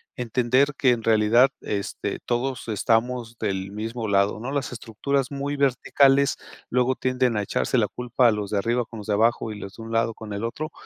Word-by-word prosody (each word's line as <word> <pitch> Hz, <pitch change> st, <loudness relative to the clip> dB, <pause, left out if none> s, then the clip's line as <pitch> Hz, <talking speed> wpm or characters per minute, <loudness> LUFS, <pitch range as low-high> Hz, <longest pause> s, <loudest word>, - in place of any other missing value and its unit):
entender 125 Hz, +3 st, +2 dB
que 135 Hz, -, +2 dB
en 120 Hz, -2 st, +1 dB
realidad, 115 Hz, +4 st, +4 dB
este, 100 Hz, -1 st, -3 dB
todos 125 Hz, +1 st, -2 dB
estamos 115 Hz, +2 st, 0 dB
del 95 Hz, 0 st, -2 dB
mismo 110 Hz, +2 st, -4 dB
lado, 100 Hz, +1 st, +2 dB
¿no? 120 Hz, +4 st, -5 dB
Las 140 Hz, -2 st, -2 dB
estructuras 125 Hz, +3 st, -2 dB
muy 140 Hz, +1 st, -3 dB
verticales 140 Hz, +1 st, +3 dB, 0.3 s
luego 125 Hz, +1 st, +2 dB
tienden 125 Hz, -3 st, 0 dB
a 105 Hz, -, 0 dB
echarse 115 Hz, -, 0 dB
la 105 Hz, -4 st, +3 dB
culpa 125 Hz, 0 st, +2 dB
los 105 Hz, -2 st, -3 dB
de 105 Hz, -, -1 dB
arriba 120 Hz, +4 st, +1 dB
con 115 Hz, -, -11 dB
los 105 Hz, -, -8 dB
de 105 Hz, -, +1 dB
abajo 115 Hz, +1 st, +2 dB
y 105 Hz, -, -7 dB
los 100 Hz, 0 st, -9 dB
de 115 Hz, -, -9 dB
un 115 Hz, -, -8 dB
lado 115 Hz, 0 st, +1 dB
con 105 Hz, -2 st, -8 dB
el 100 Hz, -, -4 dB
otro, 155 Hz, +7 st, -4 dB
115 Hz, 200 wpm, -24 LUFS, 110-130 Hz, 0.3 s, realidad